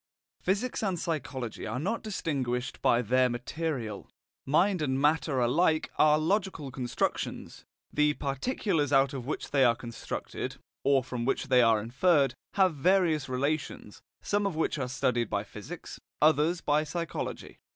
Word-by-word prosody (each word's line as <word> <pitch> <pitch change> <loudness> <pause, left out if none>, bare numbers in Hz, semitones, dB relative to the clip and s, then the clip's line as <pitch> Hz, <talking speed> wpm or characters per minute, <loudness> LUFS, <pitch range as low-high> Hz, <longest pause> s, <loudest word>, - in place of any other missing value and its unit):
Physics 205 +7 -1
and 195 -4 0
psychology 135 -8 -4
are - - -3
not 200 - -1
distinguished 135 - -3
by 120 +1 +3
their 125 +3 +3
material. 120 -3 -4 0.4
Mind 180 +5 +3
and 135 -3 0
matter 150 -1 +2
alike 155 +6 +2
are 150 0 +5
logical 165 -3 -1
constructions; 125 -1 -3 0.3
the 150 0 +3
particulars 145 - -1
out 135 0 +4
of 130 -2 -6
which 150 - -4
they 140 -2 +4
are 120 -2 +5
constructed, 115 0 -6 0.3
or 135 -2 +3
from 125 -1 -4
which 135 +2 -1
they 125 -1 +6
are 115 -2 +4
inferred, 135 - +2 0.2
have 190 -3 +4
various 160 -2 +2
relations, 130 -4 -3 0.2
some 205 0 +1
of 190 - -3
which 160 -1 0
are 125 -2 -2
studied 120 -2 0
by 100 0 -1
physics, 120 - -9 0.2
others 155 +3 +3
by 150 +1 +2
psychology. 170 +2 -5
145 Hz, 145 wpm, -29 LUFS, 125-165 Hz, 0.4 s, they